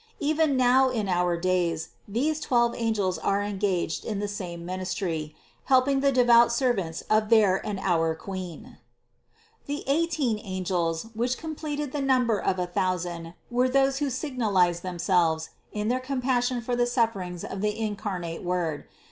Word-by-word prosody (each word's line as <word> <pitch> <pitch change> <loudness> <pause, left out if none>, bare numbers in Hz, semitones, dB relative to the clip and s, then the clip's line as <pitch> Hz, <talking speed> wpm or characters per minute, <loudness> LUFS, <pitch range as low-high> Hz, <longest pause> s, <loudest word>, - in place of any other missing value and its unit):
Even 305 -2 +2
now 255 +1 +5
in 220 -5 -2
our 175 -1 +1
days 170 -2 0 0.2
these 285 +9 0
twelve 240 -5 +2
angels 215 -5 0
are 200 +1 +1
engaged 195 -5 -1
in 215 - -3
the 205 +1 -2
same 175 -4 -6
ministry, 175 -4 -3 0.3
helping 270 +1 +3
the 275 0 +3
devout 240 -2 +5
servants 235 -10 0
of 215 0 +2
their 210 -5 +4
and 210 -2 -3
our 165 -4 +1
Queen. 185 -1 -7 0.9
373. 285 - -1
The - - -7
eighteen 285 -6 +1
angels, 180 -4 -1
which 245 +3 -1
completed 300 -3 -4
the 290 - -2
num 260 -2 +3
ber 225 -3 +1
of 185 - 0
a 180 - 0
thousand 175 -2 -2 0.2
were 250 +1 +2
those 270 +1 +2
who 290 -2 0
signalized 215 - +1
themselves 175 -3 0 0.2
in 210 0 -2
their 250 +1 +1
compassion 255 -2 0
for 245 +2 -2
the 245 0 +2
sufferings 215 -8 -1
of 190 - -5
the 210 +1 -1
incarnate 195 -6 -3
Word. 175 -4 -2
210 Hz, 155 wpm, -26 LUFS, 180-255 Hz, 0.9 s, now